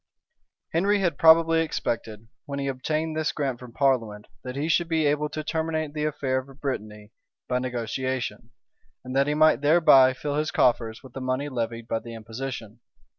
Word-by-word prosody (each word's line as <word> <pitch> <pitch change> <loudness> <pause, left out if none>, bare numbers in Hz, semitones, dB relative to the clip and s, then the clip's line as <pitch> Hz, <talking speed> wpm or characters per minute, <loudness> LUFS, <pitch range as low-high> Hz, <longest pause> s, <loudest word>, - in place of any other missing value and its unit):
Henry 195 +5 +3
had 175 -7 -1
probably 165 0 +6
expected, 115 -8 -3 0.2
when 140 -1 -4
he 140 - -2
obtained 155 +4 -2
this 155 0 0
grant 135 -5 -2
from 125 -2 -11
parliament, 115 -6 0 0.2
that 125 0 -6
he 145 +3 -2
should 165 +1 +2
be 160 -2 +1
able 150 +1 +1
to 155 +1 -5
terminate 160 -1 -2
the 150 0 -2
affair 135 -3 -1
of 135 +1 -12
Brittany 105 -6 -5 0.4
by 125 0 0
negotiation, 125 +1 -3 0.6
and 130 +1 -6
that 140 +1 +3
he 150 - +1
might 155 -4 +4
thereby 145 -4 +6
fill 145 +2 -3
his 155 +1 0
coffers 115 -1 +1
with 130 -3 -13
the 135 - -6
money 130 +3 -2
levied 115 -2 -4
by 115 - -1
the 115 0 -9
imposition. 115 0 -7
135 Hz, 175 wpm, -25 LUFS, 120-155 Hz, 0.6 s, probably